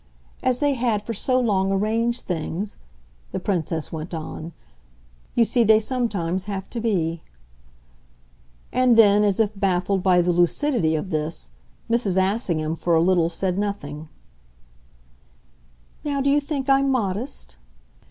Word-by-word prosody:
As 255 -1 +1
they 290 +1 +2
had 235 -5 0
for 230 - -4
so 255 +4 +1
long 195 -5 +1
arranged 225 +4 0
things," 180 +4 -4 0.5
the 190 - -3
Princess 165 -5 -2
went 160 +2 -5
on, 160 +1 -6 0.8
"you 235 - +5
see 235 +1 +2
they 215 0 +6
sometimes 205 -7 -2
have 195 -2 -5
to 235 - -4
be." 170 -7 0 1.5
And 250 -2 +4
then, 205 -2 +6
as 200 -1 +1
if 215 -2 +2
baffled 195 -1 0
by 180 -1 +4
the 175 0 +1
lucidity 175 - +2
of 170 +5 -4
this, 155 - -3 0.4
Mrs. 230 -5 +1
Assingham 185 -5 0
for 170 0 +1
a - - +4
little 175 -2 +3
said 185 +1 -1
nothing: 155 -7 -4 1.9
"Now 285 -2 -1
do 275 +1 +2
you 290 +1 +3
think 280 -2 -4
I'm 275 0 +4
modest?" 215 - -2
200 Hz, 140 wpm, -23 LUFS, 175-235 Hz, 1.9 s, they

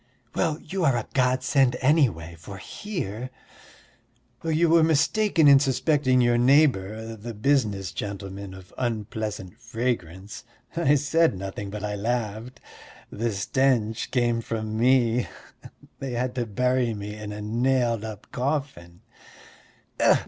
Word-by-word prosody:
Well, 160 -4 0
you 185 +3 -4
are 135 -6 +3
a 115 - -3
godsend, 130 0 +2
anyway, 125 - +2
for 100 +4 -9
here...." 130 - -5 1.1
"You 165 +1 +2
were 165 +1 +5
mistaken 160 +3 +3
in 140 -1 +8
suspecting 135 -1 +2
your 120 0 +3
neighbour, 115 -5 +2
the 115 +1 -8
business 105 -6 +1
gentleman, 100 -1 -6
of 95 -1 -14
unpleasant 110 -4 -4
fragrance.... 105 -6 -4 0.3
I 160 -4 +3
said 150 - +2
nothing, 100 +1 -5
but 105 0 -6
I 105 -1 -2
laughed. 115 +2 -3 0.5
The 115 +2 -2
stench 115 +1 0
came 120 -2 +1
from 110 -1 -4
me: 120 0 +3 0.7
they 135 -2 -4
had 125 +1 -1
to 120 -2 -2
bury 125 +2 +1
me 105 0 -6
in 105 -1 -7
a 105 - -6
nailed 120 +1 +1
up 110 -2 -7
coffin." 125 - -3
120 Hz, 125 wpm, -25 LUFS, 105-135 Hz, 1.1 s, in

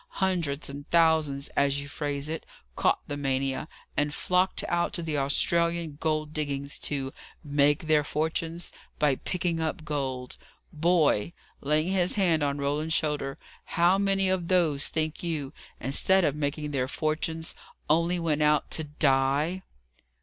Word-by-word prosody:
Hundreds 170 -7 0
and 140 +2 -7
thousands, 160 -4 +3
as 140 0 +1
you 140 - -6
phrase 145 0 -3
it, 160 +1 -4 0.3
caught - - +2
the 145 - -3
mania, 135 0 -1 0.3
and 145 0 0
flocked 185 +1 +1
out 170 +2 0
to 175 -4 -2
the 160 -2 -2
Australian 170 +3 +1
gold 155 -1 -1
diggings, 140 -2 -3
to 135 -2 -2 0.3
'make 145 +1 +2
their 155 -1 +4
fortunes' 160 +3 -2 0.3
by 150 -2 +3
picking 175 +2 -2
up 160 0 -2
gold. 130 -4 -3 0.4
Boy!" 165 -4 +2 0.3
laying 155 +4 +1
his 185 -2 +2
hand 175 -6 +3
on 140 -1 0
Roland's 150 +3 0
shoulder 145 -3 -1 0.4
"how 175 +3 +5
many 195 -1 +2
of 185 -2 0
those, 165 -6 +2
think 155 -1 -2
you, 155 -5 -3 0.3
instead 190 +7 +3
of 145 - +1
making 150 0 -2
their 130 -3 0
fortunes, 160 +2 -2 0.3
only 170 +3 +2
went 160 -3 0
out 150 -1 +3
TO 160 - -1
DIE?" 145 +4 +2
155 Hz, 145 wpm, -28 LUFS, 140-170 Hz, 0.4 s, how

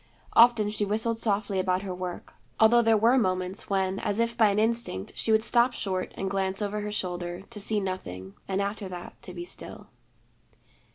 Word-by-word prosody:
Often 230 -3 +5
she 210 - -1
whistled 220 +3 0
softly 200 -3 0
about 185 0 0
her 190 -2 -4
work, 180 -1 -6 0.3
although 230 +2 +6
there 225 -1 +4
were 235 +5 +4
moments 185 -2 -1
when 190 -1 0
as 205 +2 -1
if 230 0 0
by 225 -2 +5
an 200 - 0
instinct 225 - 0
she 225 - 0
would 220 0 +4
stop 240 +1 +4
short 185 -5 -3
and 195 - -2
glance 190 0 -1
over 210 0 -2
her 210 0 -4
shoulder, 175 -2 -3
to 220 - -7
see 210 +1 +2
nothing, 95 - -5
and 195 +1 0
after 200 -1 -4
that 175 -1 -8
to - - -10
be 175 -1 -7
still. - - -5
200 Hz, 190 wpm, -27 LUFS, 185-220 Hz, 0.3 s, although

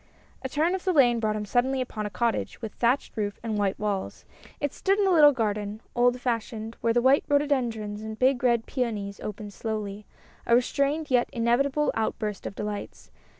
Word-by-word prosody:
A 265 - -4
turn 315 +6 +1
of 380 - -3
the 370 - +1
lane 245 -6 +5
brought 215 -1 0
him 210 0 -3
suddenly 260 +5 +1
upon 215 -4 -3
a - - -5
cottage, 235 +2 -1
with 220 -3 -6
thatched 245 +4 0
roof 205 -2 -3
and 225 -2 -2
white 195 -2 0
walls; 205 -2 -3 0.3
it 290 -1 -2
stood 390 +1 +1
in 410 - +2
a 380 - +3
little 300 -4 +8
garden, 210 -4 -2
old 245 +1 +3
fashioned, 230 -2 -3
where 230 - +2
the 240 +1 +2
white 265 +2 +5
rhododendrons 240 -8 0
and 220 0 -6
big 255 0 +2
red 235 -2 +3
peonies 210 -6 -3
opened 210 0 -7
slowly, 210 -2 -4 0.4
a 235 - +5
restrained 280 +5 +1
and 300 -3 -10
yet 245 -1 +3
inevitable 265 +5 +1
outburst 215 -2 -2
of - - -7
delights. 210 -1 -6
235 Hz, 195 wpm, -26 LUFS, 215-270 Hz, 0.4 s, little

